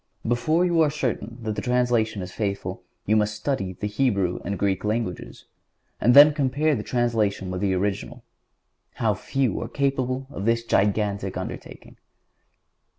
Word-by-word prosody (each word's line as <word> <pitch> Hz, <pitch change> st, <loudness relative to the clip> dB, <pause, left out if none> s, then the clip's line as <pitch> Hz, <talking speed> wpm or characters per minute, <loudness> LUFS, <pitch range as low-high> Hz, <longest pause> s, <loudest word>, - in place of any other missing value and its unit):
Before 155 Hz, +9 st, +2 dB
you 170 Hz, -2 st, +3 dB
are 155 Hz, -, +4 dB
certain 125 Hz, -5 st, -3 dB
that 110 Hz, -1 st, -2 dB
the -, -, -3 dB
translation 120 Hz, -5 st, +1 dB
is 90 Hz, -, -8 dB
faithful 100 Hz, -3 st, -3 dB, 0.2 s
you 110 Hz, -, +2 dB
must 105 Hz, -1 st, +1 dB
study 105 Hz, -5 st, -2 dB
the 100 Hz, -, -6 dB
Hebrew 105 Hz, -5 st, 0 dB
and 100 Hz, +2 st, -3 dB
Greek 95 Hz, -2 st, 0 dB
languages, 105 Hz, -4 st, -3 dB, 0.5 s
and 120 Hz, +3 st, +4 dB
then 150 Hz, +1 st, +9 dB
compare 145 Hz, +2 st, +1 dB
the 115 Hz, -, -1 dB
translation 110 Hz, -6 st, 0 dB
with 90 Hz, 0 st, -4 dB
the 95 Hz, -2 st, +1 dB
original. 100 Hz, +1 st, -3 dB, 0.7 s
How -, -, +1 dB
few 135 Hz, -3 st, -1 dB
are -, -, -4 dB
capable 135 Hz, -2 st, -1 dB
of 100 Hz, -, -5 dB
this 115 Hz, 0 st, +2 dB
gigantic 105 Hz, -2 st, 0 dB
undertaking! -, -, -8 dB
110 Hz, 150 wpm, -24 LUFS, 100-130 Hz, 0.7 s, then